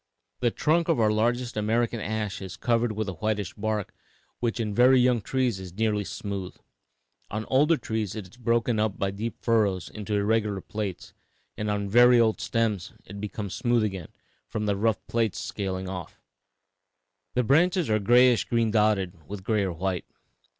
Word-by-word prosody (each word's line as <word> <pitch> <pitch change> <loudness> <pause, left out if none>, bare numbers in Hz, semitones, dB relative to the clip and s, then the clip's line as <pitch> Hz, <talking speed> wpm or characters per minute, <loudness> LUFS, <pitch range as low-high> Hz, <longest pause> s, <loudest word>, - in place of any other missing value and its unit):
'The 120 - +2
trunk 165 +7 +1
of 160 - +2
our 110 -1 +4
largest 120 +3 0
American 115 +2 0
ash 105 -2 -3
is 95 -1 -7
covered 115 +1 +1
with 110 0 -3
a 95 - -3
whitish 105 +1 -2
bark 105 -1 -3 0.5
which 120 0 -1
in 105 -2 -1
very 125 +3 +6
young 125 -2 +3
trees 125 -4 0
is 90 -2 -9
nearly 105 -2 +1
smooth; 100 -2 -5 0.7
on 110 +1 -4
older 150 +5 +4
trees 110 -6 -3
it 105 -4 -6
is 95 - -19
broken 120 -1 +1 0.2
by 100 0 -1
deep 110 +4 -4
furrows 105 -6 +1
into 105 0 -4
irregular 105 -1 +1
plates, 100 -1 -5 0.4
and 105 0 -3
on 100 -1 -1
very 120 +3 +6
old 110 -2 +2
stems 110 -6 -1
it 100 +1 -9
becomes 105 -2 -5
smooth 120 0 +1
again, 95 -6 -3 0.4
from 105 -1 -3
the 100 -1 +1
rough 110 +1 0
plates 115 -4 0
scaling 95 -2 -4
off. 90 -2 -7 1.2
The 125 - +3
branches 170 - +3
are 110 -1 +2
grayish 120 +3 +5
green 115 -2 +1
dotted 105 -4 +2
with 100 -2 -7
gray 105 +1 +1
or 95 - -1
white.' 90 +1 -2
110 Hz, 170 wpm, -26 LUFS, 100-120 Hz, 1.2 s, very